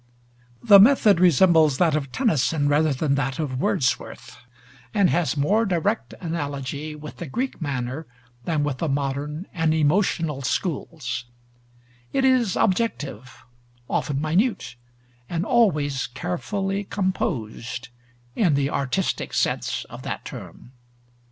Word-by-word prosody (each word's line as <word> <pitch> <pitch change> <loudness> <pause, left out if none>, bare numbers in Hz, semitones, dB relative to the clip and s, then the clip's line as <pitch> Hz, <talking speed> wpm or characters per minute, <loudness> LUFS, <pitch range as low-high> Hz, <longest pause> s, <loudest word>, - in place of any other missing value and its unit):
The 205 -4 +8
method 215 -4 +6
resembles 165 -4 +5
that 165 -4 +3
of 140 -4 -3
Tennyson 155 - +1
rather 150 +2 +3
than 140 +1 0
that 135 -1 -1
of 135 -5 -3
Wordsworth, 125 -2 -1 0.6
and 200 -4 +4
has 165 -3 0
more 205 +11 +2
direct 165 - -1
analogy 145 -3 -4
with 150 0 -10
the 170 - -6
Greek 250 - -3
manner 140 +1 -3 0.4
than 155 -3 0
with 145 -3 -2
the 165 - -1
modern 145 +4 -2
and 160 -2 +1
emotional 160 -2 +1
schools; 140 -4 -3 0.9
it 270 - +2
is 250 -7 +3
objective, 150 - -1 0.4
often 140 -2 -1
minute, 180 - 0 0.5
and 170 +2 -2
always 150 - +2
carefully 195 - -3
composed, 130 - -3 0.5
in 175 -10 +3
the 140 +1 0
artistic 140 +8 -1
sense - - 0
of - - -11
that - - -5
term. 125 - -10
155 Hz, 120 wpm, -24 LUFS, 140-185 Hz, 0.9 s, The